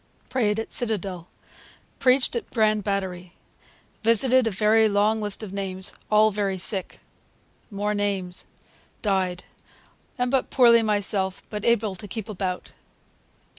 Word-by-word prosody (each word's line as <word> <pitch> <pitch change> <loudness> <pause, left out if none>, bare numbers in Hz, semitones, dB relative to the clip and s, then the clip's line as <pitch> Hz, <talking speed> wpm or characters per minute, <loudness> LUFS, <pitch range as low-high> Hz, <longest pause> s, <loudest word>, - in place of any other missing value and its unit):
Prayed 220 -4 0
at 225 - -5
Citadel. 195 -7 0 0.7
Preached 255 0 +2
at 235 - -4
Grand 215 -2 +1
Batery. 185 -3 -4 0.7
Visited 235 +2 +6
[a 220 +2 +3
long 210 +2 +1
list 205 +1 -2
of 200 -3 -8
names] 190 -1 -3 0.2
all 215 0 +4
verry 200 -2 -2
Sick. 190 0 -1 0.7
[More 205 0 -2
names] 195 -3 -3 0.6
Dy'd. 185 -4 -1 0.7
Am 250 -1 -1
but 265 -2 0
poorly 235 -2 +5
myself, 205 -3 -1
but 210 -1 -5
able 225 -3 +1
to 205 +3 -8
keep 220 +1 -6
about.' 185 -3 -4
210 Hz, 125 wpm, -24 LUFS, 190-225 Hz, 0.7 s, Visited